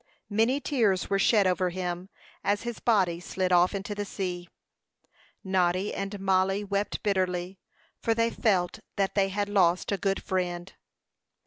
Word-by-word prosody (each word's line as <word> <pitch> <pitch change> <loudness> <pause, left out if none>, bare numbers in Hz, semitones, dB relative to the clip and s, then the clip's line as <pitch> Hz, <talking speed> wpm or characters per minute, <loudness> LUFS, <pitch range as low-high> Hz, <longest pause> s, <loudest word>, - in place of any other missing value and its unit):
Many 225 +6 +2
tears 220 - +1
were 195 - +2
shed 205 0 +4
over 185 0 +2
him, 180 +1 -4 0.3
as 205 +2 +1
his 240 -1 -5
body 185 -7 +2
slid 185 +1 -2
off 180 +2 +4
into 200 +1 -4
the 205 0 -3
sea. 180 -3 -4 0.9
Noddy 185 0 +1
and 195 +1 -4
Mollie 195 +1 +2
wept 200 0 -2
bitterly, 185 -2 -1 0.4
for 225 - +1
they 230 0 +2
felt 190 -3 +1 0.2
that 195 -2 0
they 195 -1 +2
had 205 +1 -1
lost 185 -3 +2
a 200 - -1
good 195 -1 -1
friend. 180 -1 -2
195 Hz, 150 wpm, -28 LUFS, 180-205 Hz, 0.9 s, shed